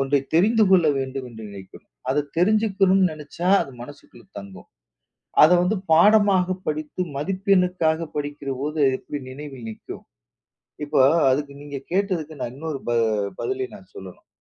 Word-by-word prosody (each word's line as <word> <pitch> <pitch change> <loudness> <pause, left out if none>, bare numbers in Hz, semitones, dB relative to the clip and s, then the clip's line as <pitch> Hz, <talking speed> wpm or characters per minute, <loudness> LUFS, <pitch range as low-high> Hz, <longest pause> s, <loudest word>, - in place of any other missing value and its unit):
ஒன்றை 135 +1 +2
தெரிந்து 215 +6 +4
கொள்ள 180 -4 +5
வேண்டும் 135 0 -4
என்று 110 -1 -11
நினைக்கணும். 95 -8 -13 0.2
அதைத் 145 +1 -1
தெரிஞ்சுக்கணும்னு 195 -1 +3
நினைச்சா 155 +4 -5
அது - - -9
மனசுக்குள்ள 135 -3 -14
தங்கும். 100 -1 -12 0.7
அத 155 - +8
வந்து 195 +5 +1 0.2
பாடமாகப் 185 0 +4
படித்து 155 +3 -4 0.2
மதிப்பெண்ணுக்காகப் 180 -2 0
படிக்கிறபோது 145 0 -4
அது 135 - +2
எப்டி 145 - -6
நினைவில் 135 -3 -9
நிக்கும்? 110 - -10 0.8
இப்ப 145 - -4 0.3
அதுக்கு 140 +2 -1
நீங்கக் 140 -2 -8
கேட்டதுக்கு 180 -5 -1
நான் 120 - -4
இன்னொரு 155 -1 -5
ப - - +1 0.5
பதிலைத் 390 -1 -3
நான் - - -18
சொல்லணும். - - -12
155 Hz, 135 wpm, -23 LUFS, 140-185 Hz, 0.8 s, அத